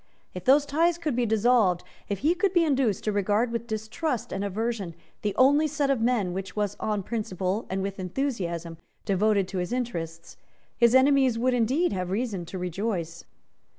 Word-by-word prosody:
If 180 Hz, -, -7 dB
those 280 Hz, +3 st, +5 dB
ties 330 Hz, +4 st, +2 dB
could 310 Hz, -7 st, -2 dB
be 245 Hz, -1 st, +1 dB
dissolved, 220 Hz, -4 st, +3 dB, 0.3 s
if 200 Hz, -, -1 dB
he 325 Hz, -, +5 dB
could 365 Hz, +1 st, 0 dB
be 345 Hz, -2 st, +4 dB
induced 265 Hz, -, +1 dB
to 215 Hz, -, 0 dB
regard 205 Hz, +4 st, +1 dB
with 235 Hz, 0 st, -3 dB
distrust 235 Hz, +3 st, -3 dB
and 195 Hz, -, -2 dB
aversion 205 Hz, -3 st, -3 dB, 0.3 s
the 205 Hz, -2 st, -2 dB
only 285 Hz, +6 st, +5 dB
set 290 Hz, -2 st, 0 dB
of 260 Hz, -4 st, 0 dB
men 225 Hz, -7 st, +1 dB
which 190 Hz, 0 st, -5 dB
was 205 Hz, -1 st, -1 dB
on 210 Hz, -2 st, -1 dB
principle 200 Hz, -1 st, -2 dB
and 190 Hz, 0 st, -2 dB
with 195 Hz, 0 st, -4 dB
enthusiasm 175 Hz, -, -3 dB, 0.3 s
devoted 200 Hz, -1 st, +2 dB
to 190 Hz, -, -3 dB
his 180 Hz, +3 st, -3 dB
interests, 170 Hz, -10 st, -4 dB, 0.4 s
his 235 Hz, 0 st, +4 dB
enemies 265 Hz, -2 st, +4 dB
would 250 Hz, +2 st, +1 dB
indeed 250 Hz, +6 st, +1 dB
have 180 Hz, -2 st, -3 dB
reason 200 Hz, -3 st, -2 dB
to 190 Hz, -, -6 dB
rejoice. 180 Hz, -2 st, -3 dB
220 Hz, 180 wpm, -26 LUFS, 190-255 Hz, 0.4 s, those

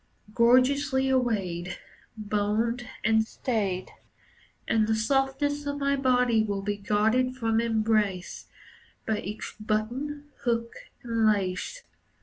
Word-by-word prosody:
Gorgeously 265 Hz, +3 st, +3 dB
arrayed, 195 Hz, -9 st, -1 dB, 0.4 s
Boned 215 Hz, +3 st, -1 dB, 0.2 s
and 220 Hz, 0 st, +4 dB
stayed. 205 Hz, -5 st, -2 dB, 0.8 s
And 220 Hz, -1 st, +2 dB
the 220 Hz, -, +2 dB
softness 270 Hz, +5 st, 0 dB
of 285 Hz, 0 st, -2 dB
my 280 Hz, 0 st, +1 dB
body 250 Hz, -4 st, +3 dB
will 200 Hz, -2 st, -2 dB
be 205 Hz, +1 st, -1 dB
guarded 220 Hz, +5 st, +1 dB
from 225 Hz, -2 st, +1 dB
embrace 215 Hz, -5 st, 0 dB, 0.6 s
By 220 Hz, -1 st, 0 dB
each 210 Hz, +3 st, -6 dB
button, 255 Hz, +8 st, -3 dB
hook, 230 Hz, -1 st, 0 dB, 0.3 s
and 230 Hz, -2 st, +1 dB
lace. 200 Hz, -, -1 dB
225 Hz, 110 wpm, -27 LUFS, 210-260 Hz, 0.8 s, and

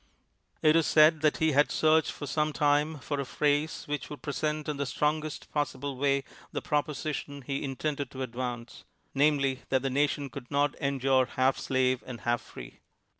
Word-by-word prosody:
It 155 Hz, 0 st, +6 dB
is 165 Hz, -2 st, +3 dB
said 155 Hz, 0 st, +5 dB
that 155 Hz, -1 st, +3 dB
he 160 Hz, 0 st, +2 dB
had 145 Hz, +1 st, +3 dB
searched 160 Hz, 0 st, +3 dB
for 145 Hz, -, -7 dB
some 150 Hz, +1 st, 0 dB
time 150 Hz, +1 st, +2 dB
for 145 Hz, +1 st, -4 dB
a -, -, 0 dB
phrase 145 Hz, +3 st, 0 dB
which 150 Hz, -1 st, -4 dB
would 145 Hz, -3 st, -9 dB
present 150 Hz, +1 st, -2 dB
in 150 Hz, -2 st, -2 dB
the 140 Hz, -1 st, -2 dB
strong 150 Hz, +3 st, 0 dB
est 155 Hz, -2 st, -7 dB
possible 145 Hz, -2 st, -2 dB
way 140 Hz, +1 st, +1 dB, 0.3 s
the -, -, -2 dB
proposition 145 Hz, -1 st, -3 dB
he 135 Hz, +1 st, -3 dB
intended 140 Hz, 0 st, -3 dB
to 130 Hz, 0 st, -5 dB
advance 120 Hz, -1 st, -5 dB, 0.2 s
— -, -, -43 dB
namely, 140 Hz, -2 st, +2 dB
that 130 Hz, -1 st, +1 dB
the 135 Hz, -, -1 dB
nation 140 Hz, 0 st, 0 dB
could 125 Hz, -1 st, -9 dB
not 145 Hz, 0 st, +1 dB
endure 135 Hz, -2 st, +2 dB
half 130 Hz, +1 st, +1 dB
slave 130 Hz, -1 st, +1 dB
and 125 Hz, -2 st, -7 dB
half 120 Hz, 0 st, 0 dB
free. -, -, -11 dB
145 Hz, 185 wpm, -29 LUFS, 130-150 Hz, 0.3 s, It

